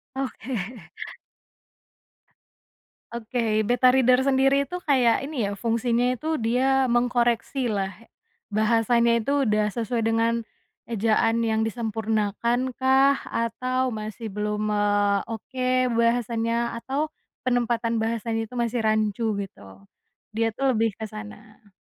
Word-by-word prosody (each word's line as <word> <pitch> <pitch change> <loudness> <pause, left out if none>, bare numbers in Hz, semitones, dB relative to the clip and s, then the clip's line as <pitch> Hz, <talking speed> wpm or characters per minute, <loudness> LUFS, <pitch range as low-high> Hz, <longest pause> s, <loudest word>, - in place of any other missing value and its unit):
Oke. 265 -1 -4 2.6
Oke 225 -2 -1
beta 245 +3 +4
reader 255 0 +4
sendiri 270 +1 +2
itu 360 - -3
kayak 260 -3 +3
ini 265 -9 -2
ya 200 - -5
fungsinya 235 +2 +1
itu 315 +5 -2
dia 260 +3 +2
mengkoreksi 240 +1 +1
lah, 200 -4 -1 0.6
bahasanya 230 +2 +3
itu 230 +4 -2 0.2
udah 210 0 +2
sesuai 230 -1 -2
dengan, 225 +1 +2 0.5
ejaan 225 +1 +1
yang 220 0 +1
disempurnakan 225 +2 -1
kah 265 +1 +4
atau 255 +3 -1
masih 220 0 -6
belum, 210 +1 -2
eee, 205 -1 +2
oke 255 +3 -5 0.3
bahasanya 235 0 0
atau 280 +6 -2 0.4
penempatan 235 -2 0
bahasanya 225 0 -1
itu 225 - -16
masih 235 0 0
rancu 215 0 +1 0.2
gitu, 195 - -9 0.7
dia 225 0 0
tuh 270 +4 0
lebih 225 -1 +1
ke 220 - -5
sana. 215 0 -11
230 Hz, 115 wpm, -25 LUFS, 220-250 Hz, 2.6 s, beta